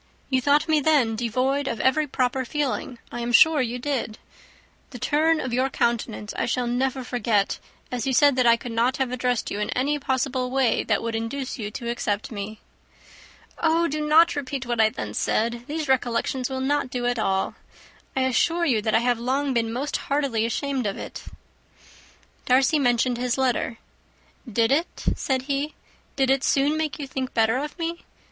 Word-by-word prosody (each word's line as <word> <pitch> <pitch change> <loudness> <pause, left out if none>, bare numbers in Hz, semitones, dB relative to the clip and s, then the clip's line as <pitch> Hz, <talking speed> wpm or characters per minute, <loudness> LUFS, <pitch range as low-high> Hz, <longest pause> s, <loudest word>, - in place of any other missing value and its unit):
You 260 0 +3
thought 290 +4 +3
me 310 -1 +3
then 280 -7 +3
devoid 255 +5 0
of 230 - -2
every 295 +3 +2
proper 260 -1 0
feeling, 265 -2 -2
I 240 - -5
am 235 0 -2
sure 310 +4 +6
you 245 0 -2
did. 250 -4 -3 0.7
The 250 - -9
turn 310 +6 +2
of 255 -4 -3
your 260 +2 +1
countenance 235 -4 -1
I - - -1
shall 250 +1 0
never 255 +2 -1
forget, 225 -5 0 0.3
as 250 -1 -2
you - - +1
said 285 +2 +5
that 250 -1 +4
I 235 0 +6
could 240 +1 -7
not 235 +3 +1
have 265 -2 -1
addressed 250 -1 -1
you 205 - -3
in 210 - -2
any 290 +3 +1
possible 260 -1 -1
way 260 -1 +2
that - - +1
would 230 0 -2
induce 250 +4 -4
you 210 -2 -3
to 235 +3 -7
accept 220 -3 -2
me." 210 0 -6 1.0
"Oh, 330 +1 +2
do 305 0 -3
not 320 +3 +5
repeat 275 -2 -4
what 240 -2 +1
I 220 - +5
then 105 - -6
said. 235 - 0
These 305 0 -3
recollections 255 0 0
will 260 0 -3
not 285 0 0
do 245 -1 -3
at 245 -1 0
all. 190 -2 0 0.6
I 265 - +1
assure 330 +7 +2
you 240 -9 +2
that 220 0 0
I - - +5
have 245 -1 +1
long 265 +3 0
been 230 -2 0
most 275 +6 -2
heartily 275 -6 0
ashamed 265 -1 -1
of 200 - -3
it." - - -8 1.2
Darcy 265 +4 +4
mentioned 245 -1 +2
his 250 0 0
letter. 255 -2 0 0.7
"Did 225 +2 +2
it," 320 +5 -1
said 260 -2 -1
he, 285 +2 -2 0.4
"did 265 -1 +2
it 270 0 +2
soon 285 +2 +2
make 310 -1 -2
you 290 - -5
think 265 -1 -5
better 225 +2 +3
of 295 +5 -5
me? 335 0 -4
255 Hz, 190 wpm, -24 LUFS, 235-280 Hz, 1.2 s, sure